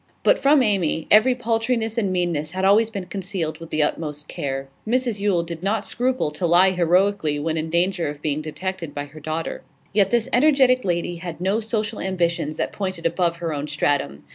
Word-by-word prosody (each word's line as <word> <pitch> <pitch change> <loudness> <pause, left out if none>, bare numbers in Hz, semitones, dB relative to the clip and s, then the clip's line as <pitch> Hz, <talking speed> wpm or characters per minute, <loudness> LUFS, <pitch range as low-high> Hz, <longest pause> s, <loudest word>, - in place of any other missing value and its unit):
But - - +4
from 280 -1 +4
Amy 185 -7 +1
every 230 +5 +6
paltriness 225 -1 -1
and 205 -5 0
meanness 170 -4 -1
had 190 +1 -1
always 215 +3 +4
been 200 -4 -5
concealed 180 -3 -4
with 165 -1 -10
the 155 - +1
utmost 150 -1 -3
care; 135 -4 -4 0.2
Mrs 240 -2 0
Yule 200 -4 +1
did 170 -1 -7
not 205 +3 -1
scruple 250 -10 0
to 175 +4 -2
lie 180 +3 +5
heroically 180 -2 +2
when 160 +2 -2
in 160 0 -2
danger 175 +1 +1
of 145 0 -5
being 150 0 -1
detected 170 +1 -5
by 145 0 -3
her 150 +2 -13
daughter. 155 +2 -4 0.3
Yet 200 -2 +4
this 235 +2 +1
energetic 255 -2 +4
lady 175 -1 -1
had 170 -1 -7
no 190 +4 +1
social 220 -1 -2
ambitions 170 -5 -1
that - - -2
pointed 185 -4 -4
above 170 0 +1
her 170 -2 -3
own 145 0 -4
stratum. 145 - -1
180 Hz, 190 wpm, -22 LUFS, 160-215 Hz, 0.3 s, every